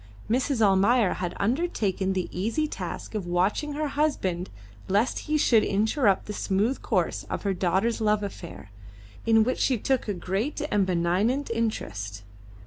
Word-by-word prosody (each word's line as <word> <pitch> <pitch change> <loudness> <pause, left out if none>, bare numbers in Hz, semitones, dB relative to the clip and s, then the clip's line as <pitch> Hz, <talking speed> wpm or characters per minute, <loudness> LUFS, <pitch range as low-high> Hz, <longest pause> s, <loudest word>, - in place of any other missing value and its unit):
Mrs. 250 +1 +1
Almayer 200 +2 +4
had 180 -1 -4
undertaken 205 - 0
the 185 -2 -1
easy 230 - -1
task - - -6
of 205 -5 -3
watching 190 +12 0
her 300 0 -2
husband 195 - -1 0.4
lest 205 +6 +1
he 305 - +3
should 230 -7 +4
interrupt 210 0 +2
the 210 - -5
smooth 210 +6 0
course - - 0
of - - -5
her 200 -2 +1
daughter's 190 +6 0
love 210 -1 +2
affair, 175 - -8 0.6
in 225 -1 +5
which 255 +3 -1
she 255 - +2
took 260 +3 0
a 205 - 0
great 195 - -2
and 200 -2 +2
benignant 190 +10 +1
interest. 105 - -3
210 Hz, 150 wpm, -26 LUFS, 185-245 Hz, 0.6 s, in